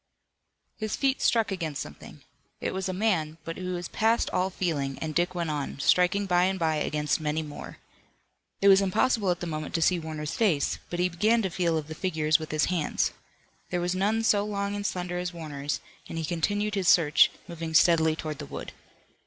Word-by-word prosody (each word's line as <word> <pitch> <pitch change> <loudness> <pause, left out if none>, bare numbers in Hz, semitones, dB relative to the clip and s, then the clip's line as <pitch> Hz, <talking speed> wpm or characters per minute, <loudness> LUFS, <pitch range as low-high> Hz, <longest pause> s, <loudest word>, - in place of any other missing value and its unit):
His 215 -1 -2
feet 270 -1 +1
struck 225 -3 +2
against 165 -6 -3
something. - - -9 0.4
It - - -2
was 190 0 -2
a - - 0
man, 180 -6 0
but 165 - -4
he - - -7
was 175 -1 -3
past 225 +1 +1
all 185 +1 +1
feeling, 145 -8 -2
and 155 -1 -4
Dick 175 +3 0
went 170 -3 -1
on, 145 -2 -3
striking 180 +7 +3
by 180 -1 +3
and 190 +1 0
by 160 -3 +1
against 150 +1 0
many 155 +1 -1
more. 150 -1 -9 0.8
It 200 - +4
was 195 0 +7
impossible 205 +2 +2
at 175 -1 0
the - - -2
moment 155 -1 -4
to 165 - +1
see 180 +1 +3
Warner's 155 -1 -5
face, 180 -11 +1
but 175 - -3
he 180 - +3
began 215 +6 +2
to 190 - -1
feel 170 -2 +1
of 155 - -3
the 160 - -6
figures 155 -2 +1
with 155 - -7
his 155 0 +1
hands. 170 -4 0 0.6
There 180 - -1
was 175 +1 0
none 210 +4 +1
so 205 -2 +3
long 200 -1 -2
and 205 -1 -2
slender 180 -1 -3
as 180 0 -3
Warner's, 145 -3 -4 0.3
and - - -5
he 165 - -2
continued 205 +6 -1
his 195 -3 -1
search, 155 -5 +6 0.2
moving 165 -2 -5
steadily 160 -1 +5
toward 155 -2 -5
the - - -6
wood. - - -7
175 Hz, 205 wpm, -27 LUFS, 155-195 Hz, 0.8 s, was